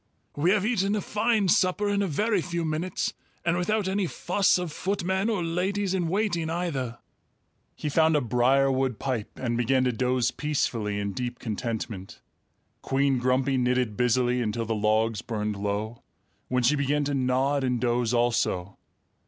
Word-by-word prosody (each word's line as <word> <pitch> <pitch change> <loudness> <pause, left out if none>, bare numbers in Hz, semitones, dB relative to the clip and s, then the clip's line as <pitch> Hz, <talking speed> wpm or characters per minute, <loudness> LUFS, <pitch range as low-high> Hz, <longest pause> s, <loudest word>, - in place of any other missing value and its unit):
"We 150 +5 +2
have 205 0 +3
eaten 205 -3 +1
a - - 0
fine 210 0 +1
supper 185 +3 +2
in 200 0 +1
a 200 - +1
very 205 +5 +1
few 170 -1 -3
minutes 160 +3 -2 0.3
and 170 0 +2
without 195 +3 0
any 190 -1 0
fuss 185 +4 +2
of 180 -3 -3
footmen 190 +4 -1
or 205 -6 0
ladies 185 +4 -1
in 180 -3 0
waiting 175 -3 0
either." 145 -9 -2 0.8
He - - -5
found 160 +2 +3
a - - +4
briarwood 130 +1 +2
pipe 125 -6 -3
and 120 -2 -2
began 130 +2 +2
to 125 - +2
doze 125 +1 +1
peacefully 115 -8 -1
in 100 -1 -3
deep 125 +1 -4
contentment. 110 -3 -5 0.6
Queen 135 -1 +1
Grumpy 130 +2 +1
knitted 125 -3 +1
busily 125 +1 +2
until 115 0 -2
the 115 - -1
logs 110 +1 +1
burned 105 -3 -3
low, 105 +3 -3 0.5
when 125 0 0
she 135 +5 +4
began 145 +1 +1
to 145 0 -1
nod 135 +1 +1
and 125 -2 0
doze 120 -1 +1
also. 115 -6 0
135 Hz, 160 wpm, -26 LUFS, 120-180 Hz, 0.8 s, a